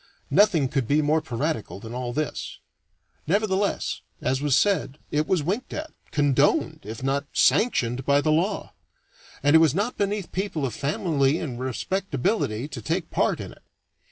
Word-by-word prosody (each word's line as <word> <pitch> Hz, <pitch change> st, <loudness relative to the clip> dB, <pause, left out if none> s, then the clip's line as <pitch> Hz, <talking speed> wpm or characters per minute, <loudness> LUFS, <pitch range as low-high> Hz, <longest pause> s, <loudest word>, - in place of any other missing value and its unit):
Nothing 175 Hz, -4 st, +4 dB
could 130 Hz, -3 st, -1 dB
be 150 Hz, +3 st, +3 dB
more 155 Hz, +2 st, +2 dB
piratical 125 Hz, -, -3 dB
than 115 Hz, +3 st, -8 dB
all 125 Hz, -1 st, -3 dB
this. 150 Hz, +4 st, -3 dB, 0.7 s
Nevertheless, 200 Hz, +2 st, 0 dB, 0.2 s
as 130 Hz, +1 st, 0 dB
was 145 Hz, -3 st, +2 dB
said, 195 Hz, -8 st, +1 dB
it 150 Hz, +1 st, +1 dB
was 180 Hz, -5 st, +1 dB
winked 200 Hz, -, -2 dB
at, 310 Hz, +1 st, -5 dB, 0.2 s
condoned, 145 Hz, -3 st, +2 dB
if 110 Hz, +4 st, -7 dB
not 140 Hz, +1 st, 0 dB
sanctioned, 130 Hz, -, +2 dB
by 140 Hz, +2 st, +3 dB
the 155 Hz, +2 st, +1 dB
law; 180 Hz, +7 st, 0 dB, 0.7 s
and 145 Hz, +2 st, +5 dB
it -, -, +9 dB
was 160 Hz, -3 st, +4 dB
not 210 Hz, +6 st, -1 dB
beneath 200 Hz, -1 st, -1 dB
people 185 Hz, -6 st, -2 dB
of 125 Hz, -, -3 dB
family 145 Hz, -, +1 dB
and 130 Hz, -8 st, -5 dB
respectability 135 Hz, -, -1 dB
to -, -, -7 dB
take 165 Hz, +1 st, -2 dB
part -, -, +1 dB
in -, -, -6 dB
it. -, -, -17 dB
150 Hz, 160 wpm, -25 LUFS, 135-190 Hz, 0.7 s, it